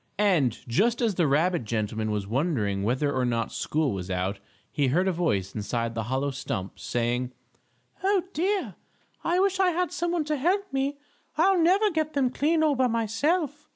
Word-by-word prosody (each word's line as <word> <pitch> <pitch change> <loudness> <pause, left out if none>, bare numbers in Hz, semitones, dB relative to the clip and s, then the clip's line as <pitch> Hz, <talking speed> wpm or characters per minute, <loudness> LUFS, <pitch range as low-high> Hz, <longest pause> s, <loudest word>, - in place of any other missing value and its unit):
And 175 - +2
just 220 - +2
as 230 -4 +1
the 170 -4 +2
rabbit 160 +2 +2
gentleman 110 0 -2
was 105 -2 -1
wondering 110 - 0
whether 130 +7 0
or 130 - 0
not 115 -2 -1
school 155 -3 0
was 95 -1 -5
out, 95 +2 -2 0.3
he 140 -2 +1
heard 175 +9 +2
a - - +3
voice 105 - -1
inside 115 +2 -2
the 115 -1 -3
hollow 135 +2 0
stump, 110 -8 -5
saying: 120 +1 -1 0.7
"Oh, 390 -2 +3
dear! 385 +5 0 0.5
I 350 +2 +1
wish 385 0 +2
I 375 -1 +4
had 355 +1 -1
some 345 -1 -1
one 340 -3 0
to 305 0 -1
help 380 +7 0
me. 275 +1 -1 0.4
I'll 385 -1 +4
never 395 +5 +4
get 315 -2 -1
them 265 -3 +1
clean 315 +4 +2
all 305 -2 +4
by 260 -1 +2
myself. 290 - -1
180 Hz, 185 wpm, -26 LUFS, -, 0.7 s, I